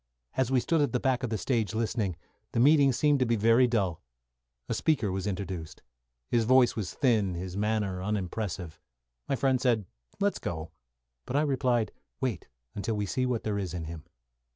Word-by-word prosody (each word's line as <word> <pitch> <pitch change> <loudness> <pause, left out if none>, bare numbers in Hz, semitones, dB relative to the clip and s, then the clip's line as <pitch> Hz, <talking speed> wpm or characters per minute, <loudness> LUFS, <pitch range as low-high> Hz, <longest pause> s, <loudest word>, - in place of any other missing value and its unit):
As 130 -2 +1
we 130 -1 +3
stood 160 +5 +1
at 140 -5 +1
the 125 - +2
back 130 -1 +1
of 125 - -2
the 110 - -1
stage 110 -1 -1
listening, 110 -4 -1 0.4
the - - +1
meeting 140 +1 +6
seemed 145 +3 +2
to 130 - +3
be 115 - +2
very 115 +4 +5
dull. 100 -9 0 0.7
A - - -1
speaker 130 -11 +1
was 95 +1 -2
introduced. 95 -5 -5 0.4
His 120 -1 +2
voice 125 +1 +5
was 100 -5 -4
thin, 110 -8 +2
his 90 +1 -5
manner 105 -3 0
unimpressive. 95 -4 -3 0.5
My - - +2
friend 130 -1 +1
said, 115 -6 +2 0.3
"Let's 200 0 +1
go," 80 -1 -5 0.6
but - - -3
I 145 - +4
replied, 130 -5 +1 0.3
"Wait 120 -10 -2 0.3
until 110 +2 -2
we 105 -1 -1
see 130 +6 0
what 120 -3 -1
there 105 -2 -1
is 90 -3 -4
in 85 - -4
him." 80 -1 -7
110 Hz, 185 wpm, -29 LUFS, 95-130 Hz, 0.7 s, meeting